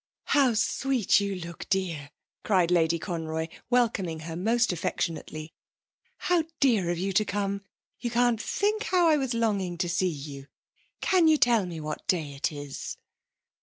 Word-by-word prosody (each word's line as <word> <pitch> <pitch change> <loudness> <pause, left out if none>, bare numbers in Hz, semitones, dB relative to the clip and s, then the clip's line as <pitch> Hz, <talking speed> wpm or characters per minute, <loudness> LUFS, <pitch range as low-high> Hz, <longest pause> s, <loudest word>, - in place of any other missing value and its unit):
'How 265 -5 +3
sweet 245 0 +2
you 200 -1 -2
look, 170 -2 -8
dear!' 170 -7 -1 0.3
cried 180 -4 +2
Lady 170 -1 +3
Conroy, 160 -2 -3 0.2
welcoming 215 -10 +1
her 165 0 -6
most 230 +4 +2
affectionately. 160 -2 -3 0.6
'How 350 -3 +1
dear 225 -10 +3
of 175 - 0
you 190 +3 -2
to 215 - +4
come. 200 0 -2 0.4
You 240 - -2
can't 240 -1 +2
think 425 - 0
how 360 -2 +3
I 310 -2 +5
was 265 -4 -1
longing 200 -6 0
to 175 0 -1
see 170 +2 +1
you. 140 -3 -7 0.5
Can 360 -3 +4
you 310 -1 +6
tell 235 -8 +3
me 170 -2 -6
what 150 0 -6
day 155 -6 0
it 140 +3 -1
is?' 145 -2 -6
190 Hz, 160 wpm, -27 LUFS, 165-240 Hz, 0.6 s, you